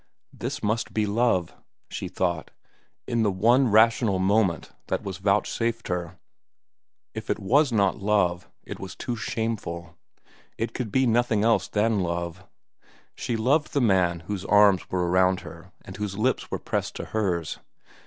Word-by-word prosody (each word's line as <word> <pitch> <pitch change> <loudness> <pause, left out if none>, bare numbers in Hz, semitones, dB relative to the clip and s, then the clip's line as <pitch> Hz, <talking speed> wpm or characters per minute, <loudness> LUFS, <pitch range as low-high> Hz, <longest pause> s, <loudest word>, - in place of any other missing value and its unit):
This - - -5
must 110 +2 -1
be 110 -1 +2
love, 105 -4 +1 0.3
she - - -5
thought, 85 -4 -2 0.6
in 115 - 0
the 110 - +3
one 120 +8 +3
rational 110 -1 +4
moment 95 -2 +1 0.2
that - - -2
was 95 -2 -5
vouchsafed 115 +4 0
her. 90 0 -3 1.0
If - - -7
it - - +1
was 135 +7 +2
not 100 -2 +2
love, 95 -4 +1
it - - -8
was - - -7
too 120 - -4
shameful. 100 -7 -4 0.6
It 115 +1 -3
could 120 -5 -4
be 130 0 +3
nothing 115 -2 +2
else 110 -5 +3
than 110 0 +1
love. 85 0 -3 0.7
She 115 - -3
loved 140 +7 +1
the 140 - +2
man 90 -7 +2
whose 95 +2 -5
arms 105 -2 +4
were 90 -1 0
around 95 +1 +3
her 90 +2 -12
and 95 - -9
whose 105 -2 -4
lips 125 +5 0
were - - -2
pressed - - -3
to - - -5
hers. 90 -7 -2
105 Hz, 155 wpm, -25 LUFS, 90-115 Hz, 1.0 s, rational